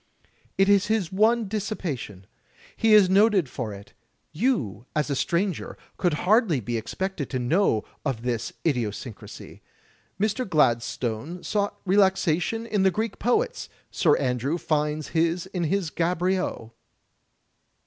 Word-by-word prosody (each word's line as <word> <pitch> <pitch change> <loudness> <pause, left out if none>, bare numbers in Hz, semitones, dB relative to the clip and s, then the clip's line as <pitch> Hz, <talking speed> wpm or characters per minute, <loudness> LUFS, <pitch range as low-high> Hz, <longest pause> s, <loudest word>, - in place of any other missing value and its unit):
"It 195 - +4
is 200 0 +4
his 215 -6 0
one 220 +3 +3
dissipation. 180 - -4 0.5
He 225 -1 +4
is 205 -3 +7
noted 195 -3 +4
for 125 -3 -5
it. 100 0 -11 0.4
You, 150 - -1
as 150 -1 0
a - - +1
stranger, 175 +6 -1 0.2
could 175 -5 +1
hardly 205 - +3
be 120 +1 -4
expected 160 - -3
to 130 - -2
know 125 - +2 0.2
of 130 -6 -2
this 120 -3 -2
idiosyncrasy. 120 -5 -4 0.6
Mr.^^ladstope 155 - 0
sought 205 -1 -1
relaxation 190 +2 +2
in 210 -3 0
the 190 - +5
Greek 215 +3 -3
poets. 440 - 0 0.2
Sir 155 -5 +3
Andrew 130 +4 -1
finds 150 -2 -1
his 165 +1 0
in 175 -4 -1 0.3
Gaboriau. 175 -8 -1
175 Hz, 120 wpm, -25 LUFS, 130-205 Hz, 0.6 s, is